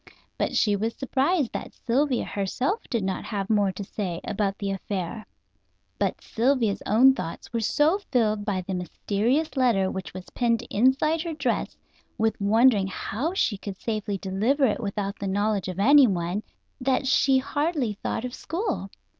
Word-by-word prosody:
But - - -1
she 210 -2 +3
was 220 +3 -2
surprised 275 +2 0
that - - -6
Sylvia 255 +1 +1
herself 250 - -1
did 230 -5 0
not 190 -1 -2
have 200 -1 -3
more 205 -2 +3
to 200 - -6
say 185 -4 -4
about 200 -1 -1
the 200 -1 -2
affair. 195 +2 -4 0.7
But - - -1
Sylvia's 235 -3 +1
own 250 +6 +6
thoughts 170 -3 -7
were 230 - +1
so 300 - +2
filled 215 -5 +1
by 200 -3 -1
the 190 +1 -5
mysterious 210 - -1
letter 230 -8 +2
which 190 -1 -5
was 185 0 -10
pinned 235 -1 0
inside 270 +8 +3
her 335 -1 -4
dress, 270 -6 -2 0.4
with 220 -1 0
wondering 215 0 +4
how 250 - -3
she 210 - +1
could 195 -2 -6
safely 215 -2 -2
deliver 210 +10 +1
it 220 - +1
without 200 -1 -3
the 200 - -3
knowledge 205 0 0
of 185 0 -5
anyone, 205 -7 +4 0.4
that 265 +1 +1
she 265 0 +4
hardly 285 -2 -1
thought 220 +3 -3
of 250 - -5
school. 345 - -3
220 Hz, 165 wpm, -26 LUFS, 200-265 Hz, 0.7 s, own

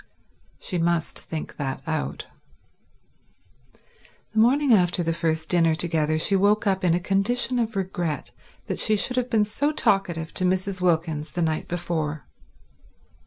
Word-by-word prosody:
She 180 - -3
must 170 -1 0
think 160 -2 -7
that 135 -2 -4
out. 155 -1 -3 2.1
The 220 - +1
morning 260 +3 +4
after 180 -3 +3
the 165 0 0
first 160 -1 -1
dinner 165 -3 +3
together, 155 -2 0
she 195 +5 +1
woke 205 +3 +3
up 190 -2 +1
in 170 -2 +3
a - - +1
condition 235 +7 0
of 225 -2 -1
regret 175 -6 -3 0.3
that - - -4
she 215 - +4
should 250 +5 0
have 250 0 0
been 215 -2 +3
so 285 +8 0
talkative 175 - 0
to - - -2
Mrs. 185 +1 0
Wilkins 160 -3 0
the 175 - -2
night 155 -1 -1
before. 160 -5 -3
175 Hz, 150 wpm, -24 LUFS, 160-200 Hz, 2.1 s, morning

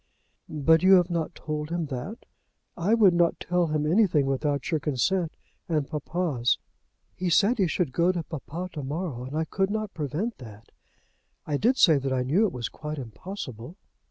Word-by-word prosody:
"But 160 +2 +3
you 190 +1 +6
have 180 -1 +5
not 165 -2 -2
told 150 0 -4
him 170 -1 -1
that?" 140 - -6 0.5
"I 195 +7 +2
would 205 -6 +5
not 170 -1 +2
tell 180 -1 +1
him 150 -1 0
anything 165 -4 +3
without 140 +2 -1
your 160 - +2
consent 160 +5 0 0.3
and 150 -4 0
papa's. 150 -5 0 0.6
He 180 -1 -2
said 210 +8 +3
he 190 - +3
should 165 -3 -1
go 170 +6 +3
to 175 -3 -3
papa 165 +4 -6
to 150 - -5
morrow, 140 -2 -4
and 140 +4 -5
I 160 - 0
could 190 +4 0
not 215 -1 -3
prevent 165 - -3
that. 110 -3 -12 0.7
I 145 -2 -1
did 245 - +2
say 155 -5 +6
that 135 0 -3
I 130 -1 +1
knew 175 - +3
it - - -5
was 120 -3 -3
quite 150 0 -6
impossible." 130 - -7
160 Hz, 185 wpm, -26 LUFS, 140-185 Hz, 0.7 s, you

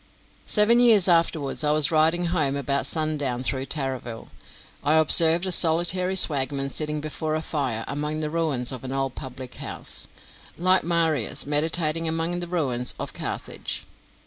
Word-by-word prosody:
Seven 225 +3 +3
years 225 -6 +4
afterwards, 165 -5 0
as - - -1
I - - +3
was 155 0 +5
riding 165 +2 +2
home 145 -5 0
about 140 0 -1
sundown 145 -6 -2
through 130 +1 -1
Tarraville, 130 -6 -4 0.5
I 150 +2 +2
observed 160 +2 +5
a 185 - -2
solitary 175 +3 +3
swagman 140 -5 +3
sitting 150 0 -2
before 155 +1 -4
a 155 - -3
fire, 130 -9 -3
among 150 +2 -3
the 155 -1 -4
ruins 150 -7 -1
of 130 -2 -8
an 130 - -6
old 135 -1 -3
public 130 -1 -9
house, - - -2 0.5
like 185 +2 +3
Marius 165 -8 +1
meditating 160 +2 0
among 165 +2 -2
the 175 - -5
ruins 130 -8 -2
of - - -5
Carthage. - - -6
155 Hz, 155 wpm, -23 LUFS, 135-170 Hz, 0.5 s, was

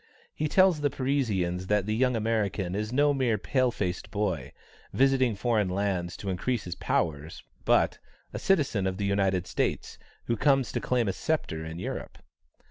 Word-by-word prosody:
He 155 - -1
tells 185 -1 +4
the 145 - +2
Parisians 105 -10 -1
that 105 -1 +2
the 110 - -1
young 125 +1 +2
American 105 -5 -1
is 105 +2 -2
no 145 +3 +3
mere 125 -5 +1
pale 130 +4 +1
faced 90 -6 -3
boy, 95 - -2 0.4
visiting 130 -4 +3
foreign 110 -2 +1
lands 90 -2 -1
to 100 - -4
increase 115 +5 -1
his 90 - -5
powers; 80 -1 -2 0.2
but - - +3 0.3
"a - - -4
citizen 140 - +1
of 95 0 -2
the 100 - -1
United 95 -2 +1
States, - - -2 0.3
who 115 - 0
comes 135 +1 +2
to - - -2
claim 125 -3 +1
a 95 - 0
sceptre 90 - -2
in 80 +1 -6
Europe." 90 - -5
105 Hz, 170 wpm, -28 LUFS, 95-130 Hz, 0.4 s, tells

